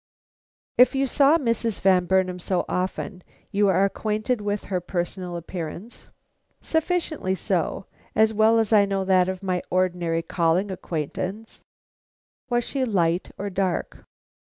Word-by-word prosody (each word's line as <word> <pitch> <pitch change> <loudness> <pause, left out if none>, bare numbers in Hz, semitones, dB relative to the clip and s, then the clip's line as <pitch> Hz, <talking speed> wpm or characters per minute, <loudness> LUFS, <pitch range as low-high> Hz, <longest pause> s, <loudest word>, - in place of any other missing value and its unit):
"If 250 +2 +6
you 270 0 +2
saw 280 +4 +4
Mrs. 230 - -1
Van 185 -2 +4
Burnam 185 -1 +1
so 180 +1 -1
often, 185 +1 -3 0.3
you 205 0 +3
are 195 0 +4
acquainted 215 +3 -1
with 205 0 -2
her 185 -2 -2
personal 175 0 -3
appearance?" 170 +5 -7 0.5
"Sufficiently 320 - -1
so; 185 -1 -1 0.3
as 220 0 +4
well 220 +1 +4
as 225 -1 +2
I 205 -2 +6
know 195 -1 -1
that 185 -1 +3
of 190 0 -5
my 180 -2 -1
ordinary 175 -2 0
calling 170 +4 +1
acquaintance." 185 +5 -5 0.9
"Was 240 -1 +1
she 270 +2 -2
light 180 -7 +1
or 200 0 -4
dark?" 185 -1 -2
190 Hz, 135 wpm, -24 LUFS, 180-220 Hz, 0.9 s, If